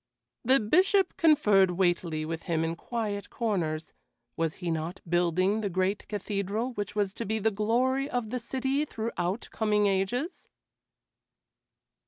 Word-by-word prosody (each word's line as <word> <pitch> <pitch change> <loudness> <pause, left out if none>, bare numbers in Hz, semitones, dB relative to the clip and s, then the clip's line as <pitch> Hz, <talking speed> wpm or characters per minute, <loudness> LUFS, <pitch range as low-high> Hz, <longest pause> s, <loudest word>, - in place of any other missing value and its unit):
The 260 +3 +5
Bishop 370 - +3
conferred 210 - +5
weightily 175 -3 0
with 165 +1 -4
him 165 -1 +1
in 165 +1 -1
quiet 210 +1 -4
corners; 170 -9 -2 0.4
was 165 -1 -1
he 175 -2 -3
not 165 +3 -3
building 180 +4 +2
the 205 - -1
great 185 +3 -1
cathedral 210 +4 -2
which 205 -2 -4
was 200 -2 0
to 230 - -4
be 220 +1 -1
the 220 +1 +1
glory 250 +7 +1
of 245 -5 -2
the 250 - -1
city 265 +4 -1
throughout 220 -7 -3
coming 210 -1 +2
ages? 200 - -1
205 Hz, 140 wpm, -28 LUFS, 180-235 Hz, 0.4 s, The